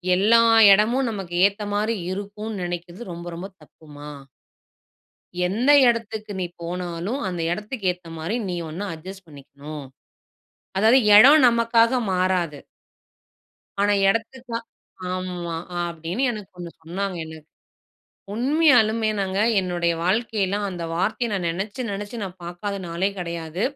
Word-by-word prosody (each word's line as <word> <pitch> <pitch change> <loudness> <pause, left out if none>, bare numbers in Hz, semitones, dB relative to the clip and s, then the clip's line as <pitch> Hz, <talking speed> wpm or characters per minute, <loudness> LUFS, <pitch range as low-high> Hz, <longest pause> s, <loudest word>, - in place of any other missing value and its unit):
"எல்லா 225 +5 +5 0.3
இடமும் 235 +6 +3
நமக்கு 190 -5 -5
ஏத்த 205 +1 -6
மாதிரி 215 +2 0 0.2
இருக்கும்ன்னு 205 0 -5
நினைக்கிறது 175 +3 -6
ரொம்ப 170 +1 -8
ரொம்ப 185 +3 -6
தப்புமா." 150 -1 -13 1.4
"எந்த 240 +9 +2 0.2
இடத்துக்கு 220 -2 -3
நீ - - 0 0.2
போனாலும் 175 +6 -4
அந்த 175 -2 -3
இடத்துக்கு 210 +1 -4
ஏத்த 175 -2 -15
மாதிரி 170 +9 -3
நீ 175 - -2
ஒன்ன 195 +6 -5
அட்ஜஸ்ட் 190 +4 -11
பண்ணிக்கணும்." 145 0 -10 0.9
அதாவது 225 +6 +5 0.2
இடம் 275 +6 +8
நமக்காக 235 +1 +3
மாறாது. 180 -5 0 1.2
ஆனா 205 0 +3 0.2
இடத்துக்கா 230 +2 -2 0.6
ஆமா. 180 -2 -4 0.3
அப்படின்னு 170 +7 -5
எனக்கு 210 -4 -8
ஒண்ணு 175 -1 -7
சொன்னாங்க 185 +2 -3
எனக்கு. 160 -1 -11 0.9
உண்மையாலுமே 240 -4 +3
நாங்க 190 0 -1 0.2
என்னுடைய 175 -2 0
வாழ்க்கைலாம் 205 0 0
அந்த 175 -2 -6
வார்த்தையை 215 +6 0
நான் 185 -3 -2
நெனச்சி 200 +8 -4
நெனச்சி 205 +4 -6
நான் 190 -1 -7
பார்க்காத 175 +4 -5
நாளே 175 +4 0
கிடையாது. 170 +1 -5
195 Hz, 120 wpm, -23 LUFS, 175-220 Hz, 1.4 s, இடம்